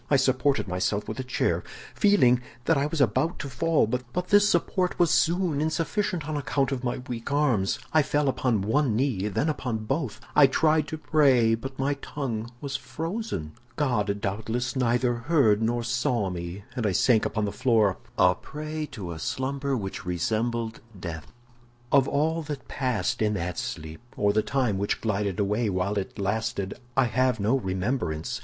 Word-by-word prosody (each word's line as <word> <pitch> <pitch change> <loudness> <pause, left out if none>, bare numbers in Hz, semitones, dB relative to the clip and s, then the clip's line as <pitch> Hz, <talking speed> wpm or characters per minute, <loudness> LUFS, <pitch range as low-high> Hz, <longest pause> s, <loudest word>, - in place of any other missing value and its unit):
I 145 - +4
supported 135 -1 +2
myself 95 +3 -1
by - - -4
a 130 - -3
chair, 130 - 0 0.3
feeling 125 -13 +4 0.2
that 165 - +4
I 140 +1 +1
was 155 -1 -1
about 130 - +2
to - - -5
fall, 165 +1 +2
but 125 +10 -3
this 205 0 +6
support 180 +1 +1
was 175 -3 +3
soon 170 -3 +2
insufficient 165 +1 -1
on 155 - -2
account 140 -1 0
of 130 -2 -3
my 120 -1 -1
weak 120 +2 -5
arms. 130 -10 +2 0.2
I 155 - +6
fell 145 0 0
upon 125 -6 +1
one 125 +2 +2
knee, 115 -6 0
then 105 +9 0
upon 125 -8 -2
both. 135 -2 -2 0.2
I 145 -2 +8
tried 155 +2 +2
to 160 - -4
pray, 135 -7 +4
but 135 +4 -4
my 135 +2 +1
tongue 120 -6 -4
was 140 -2 -4
frozen. 155 - -4 0.2
God 105 -8 0
doubtless 110 +6 -2
neither 125 -1 +2
heard 120 -4 +3
nor 120 +1 0
saw 120 -4 0
me, 85 +2 -6
and 115 -4 0
I 100 - 0
sank 115 +3 +4
upon 110 -1 -1
the 100 - -2
floor 110 -6 +2 0.2
a 90 -1 +5
prey 155 +6 -6
to 95 -6 -6
a 80 - -6
slumber 135 - -2
which 95 -4 -5
resembled 110 +6 -1 0.2
death. 80 -4 -7 0.6
"Of 135 -1 +5
all 160 +3 +1
that 145 -4 -6
passed 125 -10 -1
in 105 -1 +2
that 90 -1 -3
sleep, 80 +3 -6 0.2
or 100 0 +2
the 110 - +3
time 125 -6 0
which 100 - -1
glided 100 -3 -1
away 105 +3 +1
while 95 +1 0
it 95 - -6
lasted, 100 0 -2 0.2
I 135 - +6
have 125 +1 +1
no 105 +6 +2
remembrance. 95 - -2
125 Hz, 175 wpm, -26 LUFS, 105-145 Hz, 0.6 s, I